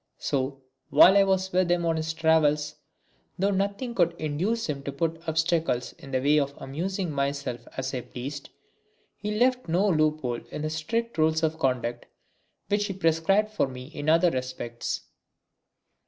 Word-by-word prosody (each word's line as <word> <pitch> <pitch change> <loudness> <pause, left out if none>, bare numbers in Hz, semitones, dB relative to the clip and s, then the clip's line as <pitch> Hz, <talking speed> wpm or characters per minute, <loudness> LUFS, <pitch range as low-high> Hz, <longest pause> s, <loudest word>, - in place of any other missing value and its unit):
So, 135 0 -2 0.3
while 190 +4 +8
I 200 - +7
was 190 -1 +1
with 180 -1 +2
him 175 -1 +2
on 165 -1 +2
his 160 0 -2
travels, 155 -2 +3 0.6
though 195 +2 +2
nothing 200 +5 -1
would 170 -1 +3
induce 180 +10 -1
him 145 -3 -3
to 140 - -4
put 165 +3 -2
obstacles 160 -6 0
in 135 - -11
the 130 -1 0
way 145 +3 +4
of 140 0 -2
my - - -7
amusing 175 +6 -3
myself 140 -4 -2
as 130 0 -3
I 125 - -2
pleased, 140 +4 -7 0.7
he 210 +1 -3
left 255 +2 +2
no 180 +5 +2
loophole 155 -8 +1
in 150 - -5
the 155 - -2
strict 230 +7 -2
rules 160 +1 +2
of 160 0 0
conduct 120 -3 -1 0.6
which 205 +1 +1
he 195 - -3
prescribed 190 +4 +2
for 215 - +1
me 130 +1 -9
in 145 +1 -2
other 165 +2 +5
respects. 125 -3 -4
160 Hz, 170 wpm, -27 LUFS, 140-190 Hz, 0.7 s, while